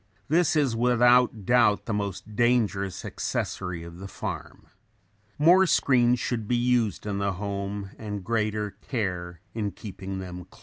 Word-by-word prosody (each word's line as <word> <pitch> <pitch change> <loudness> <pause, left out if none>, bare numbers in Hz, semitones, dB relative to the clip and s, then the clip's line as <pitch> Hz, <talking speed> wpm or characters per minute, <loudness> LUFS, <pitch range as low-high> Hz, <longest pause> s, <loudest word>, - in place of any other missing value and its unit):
This 165 +2 +3
is 140 -6 +2
without 120 -2 +4
doubt 120 -3 +4
the 115 - -2
most 105 +1 -4
dangerous 105 -5 +1
accessory 90 -2 -3
of 85 +1 -10
the 95 - -7
farm. - - -6 0.7
More 180 +5 +6
screens 125 -5 +3
should 115 -4 -2
be 125 - +1
used 120 -5 +1
in 100 -1 -2
the 100 -1 0
home 100 0 -4
and 105 -3 -5
greater 105 0 -1
care 90 - -4
in 105 -3 -2
keeping 95 0 -7
them 90 -1 -7
closed. - - -20
105 Hz, 145 wpm, -26 LUFS, 95-120 Hz, 0.7 s, More